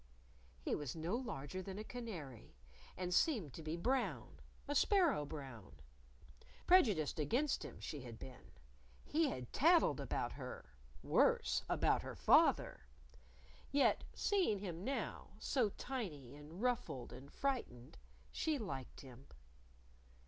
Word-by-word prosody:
He - - -2
was 145 -2 -3
no 165 +6 -1
larger 185 - -4
than 190 +1 -6
a 215 - -4
canary; 175 - -7 0.4
and 180 -1 -2
seemed 205 - +2
to - - -7
be 155 +1 -3
brown 255 +8 -1 0.3
a 290 - -1
sparrow 315 - +3
brown. 135 -9 -8 0.9
Prejudiced 210 - +4
against 245 - +1
him - - -8
she 150 - -5
had 120 -3 -8
been. 125 +1 -11 0.5
He 315 -1 +2
had 125 -2 -6
tattled - - +5
about - - -2
her - - -8 0.3
worse, - - +3
about - - +3
her - - -7
father. 65 - +4 0.8
Yet 280 0 +3
seeing 380 - +2
him 180 -3 -5
now, 275 +5 -3
so 245 -6 +1
tiny 180 - -5
and 155 +8 -9
ruffled 235 - -1
and 140 +2 -11
frightened, 130 - -3 0.3
she 315 -2 0
liked 155 - -6
him. 130 0 -13
180 Hz, 125 wpm, -38 LUFS, -, 0.9 s, tattled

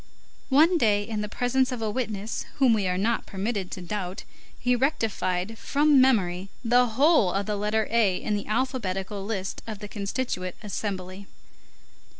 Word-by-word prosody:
One 320 +6 +5
day, 205 -4 +3
in 220 -2 -3
the 210 - -4
presence 255 +3 +1
of 250 - -3
a 220 -1 -1
witness 220 -3 -3
whom 265 -4 +4
we 205 -4 +1
are 180 0 0
not 225 +5 0
permitted 195 -1 -3
to 185 - -6
doubt, 185 0 -4 0.3
he 250 0 +1
rectified 225 - -1
from 290 -1 +4
memory 195 -7 +2 0.2
the 245 +2 +4
whole 285 - +5
of 195 +2 -1
the 210 - -1
letter 210 +1 0
A 215 -6 +3
in 210 - -2
the 205 - -4
alphabetical 210 -5 -2
list 195 -2 -4
of 220 -2 -5
the 210 - -8
Constituent 200 -3 -3
Assembly. 195 -1 -5
210 Hz, 160 wpm, -26 LUFS, 195-245 Hz, 0.3 s, One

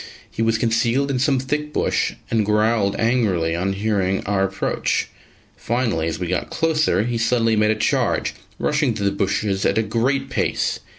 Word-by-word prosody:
He - - -4
was 115 0 +2
concealed 115 +5 +1
in 130 - -1
some 135 +1 +2
thick 150 +3 -2
bush - - 0 0.2
and 110 -2 +2
growled 105 -1 +2
angrily 100 -9 +1
on 95 +3 -1
hearing 95 -2 -1
our 100 -1 +1
approach; 95 0 -1 0.5
finally, 115 -9 -1
as 80 - -2
we 90 - -3
got 90 +1 -2
closer, 155 - +1
he 120 0 -2
suddenly 115 -1 +2
made 105 0 +3
a 110 - +2
charge, 110 - 0 0.2
rushing 145 -6 0
through 100 - -2
the 100 - +2
bushes 100 0 -1
at 100 - +1
a 110 - +3
great 130 +5 -1
pace. - - -1
110 Hz, 175 wpm, -21 LUFS, 100-125 Hz, 0.5 s, made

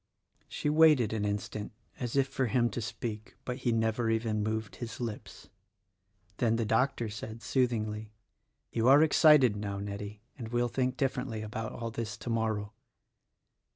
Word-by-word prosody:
She - - -4
waited 150 -7 +5
an 105 -2 -1
instant 105 +1 -3 0.3
as 120 -1 -3
if 135 -1 +3
for 135 -1 -1
him 120 0 +2
to 120 - -3
speak; 110 -1 -5
but 125 0 -3
he 125 -3 0
never 115 0 +1
even 110 -1 0
moved 110 0 -3
his 115 -3 -6
lips. 115 -4 -6 0.9
Then 115 -2 +2
the 115 -1 0
doctor 115 +1 +1
said, 110 +2 -7
sooth 130 -2 +2
ingly, 110 -2 -3 0.6
"You 115 +1 +1
are 140 +3 +8
excited 150 -7 +6
now, 100 -1 -4
Nettie, 100 +1 -6 0.2
and 115 - -5
will 120 +1 +1
think 130 +2 -1
differ 135 0 0
ently 115 -4 -5
about 110 +1 -5
all 115 -1 -4
this 110 -2 -4
tomorrow." 110 -3 -2
115 Hz, 160 wpm, -30 LUFS, 110-125 Hz, 0.9 s, are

